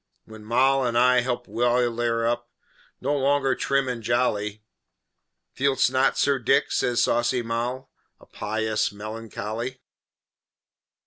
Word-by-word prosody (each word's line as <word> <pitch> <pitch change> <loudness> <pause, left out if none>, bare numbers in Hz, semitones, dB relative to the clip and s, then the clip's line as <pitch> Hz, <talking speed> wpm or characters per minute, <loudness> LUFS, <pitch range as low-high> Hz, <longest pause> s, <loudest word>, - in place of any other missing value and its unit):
When 110 -1 -12
Moll 130 +4 +2
and 120 -1 0
I 125 +1 +5
helped 125 0 -3
Wildair 120 -1 +1
up, 120 0 -1 0.5
No 145 - 0
longer 135 -1 +2
trim 135 0 0
and 125 -2 -3
jolly 105 -3 -1 0.9
"Feelst 135 -1 +2
not, 130 +1 +2
Sir 140 -1 +2
Dick," 120 - +2
says 120 -1 +1
saucy 120 +1 +1
Moll, 120 +3 -3 0.3
"A - - -18
Pious 110 +1 -2
Melancholy?" 110 +3 -6
120 Hz, 120 wpm, -25 LUFS, 115-130 Hz, 0.9 s, I